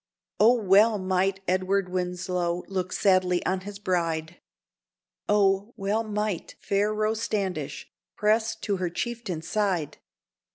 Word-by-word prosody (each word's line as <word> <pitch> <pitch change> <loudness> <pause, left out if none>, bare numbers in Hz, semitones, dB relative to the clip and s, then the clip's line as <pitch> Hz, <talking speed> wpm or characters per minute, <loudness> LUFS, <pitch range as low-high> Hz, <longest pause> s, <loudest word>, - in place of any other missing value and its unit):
O, 225 +4 +7
well 210 0 +4
might 190 0 0
Edward 185 +1 +1
Winslow 180 -1 -2
look 185 -1 -3
sadly 185 -2 +2
on 185 0 +1
his 200 +2 -8
bride! 170 -4 -2 0.9
O, 200 +2 +2
well 205 +3 0
might 210 -4 -3
fair 205 +2 +1
Rose 215 +1 0
Standish 180 -10 -3 0.3
press 220 +2 +2
to 205 -3 -2
her 180 -1 -1
chieftain's 190 -4 -4
side! 195 -8 -1
195 Hz, 120 wpm, -26 LUFS, 180-210 Hz, 0.9 s, O